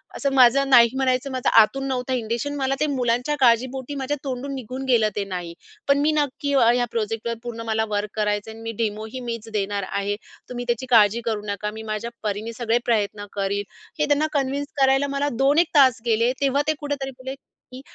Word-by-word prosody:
असं 280 - -1
माझं 270 +1 +5
नाही 235 -3 +7
म्हणायचं 265 0 0
माझं 255 -1 0
आतून 270 +5 0
नव्हता 260 -1 -2
इंनटेनशन, 240 +4 -2
मला 270 -1 0
ते - - +2
मुलांच्या 250 0 0
काळजीपोटी 260 +2 +2
माझ्या 280 +1 -2
तोंडून 270 0 -4
निघून 255 +1 -6
गेलं 220 -3 +4
ते 205 - -1
नाही 180 -3 -5 0.3
पण 280 0 +4
मी 300 +2 +3
नक्की 290 -1 -1
अ, 275 - +4
ह्या 245 0 +1
प्रोजेक्टवर 225 0 -2
पूर्ण 235 -1 -6
मला 220 0 0
वर्क 205 0 -1
करायचं 210 0 -1
आहे 220 - -9
आणि - - -12
मी 225 - -3
डेमोही 220 +3 -4
मीच 230 -3 -5
देणार 200 -1 -1
आहे. 200 +1 -1 0.3
तुम्ही 245 -1 -5
त्याची 240 +1 -1
काळजी 225 -1 +5
करू 220 -3 -1
नका. 210 0 -3
मी 220 +1 -8
माझ्या 215 +1 -4
परीने 215 +2 -3
सगळे 235 -1 0
प्रयत्न 210 -3 0
करीन." 200 0 -1 0.4
हे 300 - +3
त्यांना 295 +1 +2
कन्विन्स 280 0 -1
करायला 270 +1 +4
मला 280 +1 -1
दोन 275 +3 +3
एक 345 - +4
तास 260 -4 +5
गेले. 230 +1 +2
तेव्हा 275 0 +2
ते 310 - +3
कुठेतरी 285 -2 -4
बोलले 260 +1 -6
की 260 -1 -16
245 Hz, 200 wpm, -23 LUFS, 220-270 Hz, 0.4 s, नाही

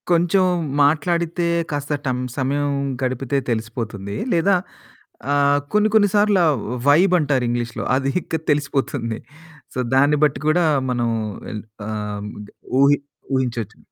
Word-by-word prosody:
కొంచెం 175 +2 +3 0.4
మాట్లాడితే 170 +3 +1 0.3
కాస్త 145 0 -2
టం 130 -2 0 0.2
సమయం 145 +2 0 0.3
గడిపితే 130 +1 -1
తెలిసిపోతుంది. 110 -3 -4 0.2
లేదా 185 +3 +3 0.8
ఆహ్, 145 0 +3
కొన్ని 210 +1 +3
కొన్ని 205 -2 +5
సార్లు 205 -1 +4
ఆ - - +4 0.4
వైబ్ 175 +6 +5
అంటారు 140 -5 +1
ఇంగ్లీష్‌లో 120 -1 -2
అది 135 +1 0
ఇక 165 - -3
తెలిసిపోతుంది. 135 -5 -1 0.5
సో - - -4 0.2
దాన్ని 145 +2 +4
బట్టి 145 -3 +2
కూడా 170 +3 +3 0.3
మనం 120 -1 0 0.4
ఎల్ 105 -1 -6 0.3
ఆహ్ 105 -1 -4 0.6
ఊహి 140 +1 +5 0.4
ఊహించొచ్చు. 120 -5 -2
140 Hz, 120 wpm, -21 LUFS, 120-165 Hz, 0.8 s, కొన్ని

